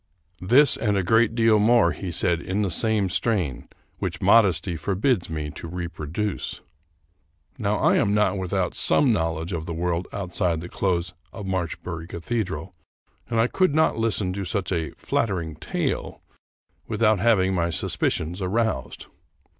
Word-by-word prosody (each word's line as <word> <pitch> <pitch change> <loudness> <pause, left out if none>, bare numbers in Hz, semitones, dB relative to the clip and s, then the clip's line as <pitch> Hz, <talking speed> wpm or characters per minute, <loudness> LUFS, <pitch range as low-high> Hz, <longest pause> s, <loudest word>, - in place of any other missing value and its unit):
This 125 +9 +5
and 105 -3 0
a 95 - +1
great 115 +4 +3
deal 115 -2 +4
more 115 +2 +4
he 95 -3 -5
said 85 0 +2
in 100 +4 -1
the 95 - -1
same 110 +2 +2
strain, 90 - -1 0.3
which - - -3
modesty 90 -6 +3
forbids 95 - 0
me 75 -2 -4
to 85 - -8
reproduce. 85 +3 -4 1.0
Now - - 0
I - - +3
am 100 - +2
not 105 -1 +2
without 95 -1 -1
some 135 -5 +3
knowledge 80 -1 -2
of 80 -1 -4
the 85 - -4
world 85 +1 -1
out 95 -3 -6
side 85 -5 +1
the 85 - -8
close 90 -2 -1 0.2
of 105 - -8
Marchbury 85 -2 -4
Cathedral, 90 -2 -4 0.6
and 115 -1 0
I 115 - +4
could 170 +4 +1
not 160 - +3
lis 115 -1 0
ten 90 -3 -1
to 100 +1 -4
such 95 +2 -2
a 80 -4 -1
" - - -18
flattering 85 -8 -1
tale - - -3 0.3
" - - -43
without 110 -3 +2
having 95 -3 +3
my 85 -2 0
sus 85 - -1
picions 85 +5 -1
aroused. 105 - -2
95 Hz, 165 wpm, -24 LUFS, 85-110 Hz, 1.0 s, This